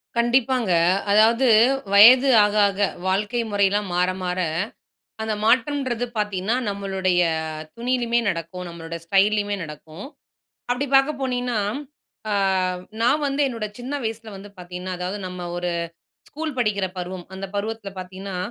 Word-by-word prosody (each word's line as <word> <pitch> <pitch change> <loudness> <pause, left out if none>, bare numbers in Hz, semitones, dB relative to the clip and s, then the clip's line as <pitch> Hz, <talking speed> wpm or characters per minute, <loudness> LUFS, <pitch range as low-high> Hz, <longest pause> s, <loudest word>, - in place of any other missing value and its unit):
கண்டிப்பாங்க. 240 -2 +2 0.4
அதாவது 230 +5 +4 0.5
வயது 250 +7 +8
ஆக, 205 0 +1
ஆக 200 0 -4 0.3
வாழ்க்கை 210 +5 0
முறையிலாம் 200 0 +1
மாற, 180 +1 +2
மாற 180 0 -2 0.8
அந்த 220 -1 -1
மாற்றம்ன்றது 250 0 +1
பாத்தீங்கன்னா, 210 0 -1
நம்மளுடைய 190 -2 0 0.6
துணியிலேயுமே 240 0 0
நடக்கும், 180 0 -4
நம்மளோட 165 -1 -8
ஸ்டைல்லேயுமே 205 +3 +2
நடக்கும். 155 - -10 0.6
அப்பிடி 250 +3 0
பாக்க 270 +2 +5
போனீங்கன்னா, 250 -3 -1 0.7
அ - - 0 0.7
நான் 285 +6 +3
வந்து 275 +1 -1
என்னோட 230 -5 -3
சின்ன 250 +3 -6
வயசுல 225 0 -4
வந்து 200 +1 -11
பார்த்தீங்கன்னா, 180 +1 -6
அதாவது 180 +3 -3
நம்ம 180 -1 -6
ஒரு 175 0 -2 0.6
ஸ்கூல் 310 -1 -5
படிக்கிற 210 -5 +1
பருவம் 180 0 -6
அந்த 195 +1 -5
பருவத்துல 210 0 -4
பாத்தீங்கன்னா, 190 +1 -7
205 Hz, 125 wpm, -23 LUFS, 185-240 Hz, 0.8 s, வயது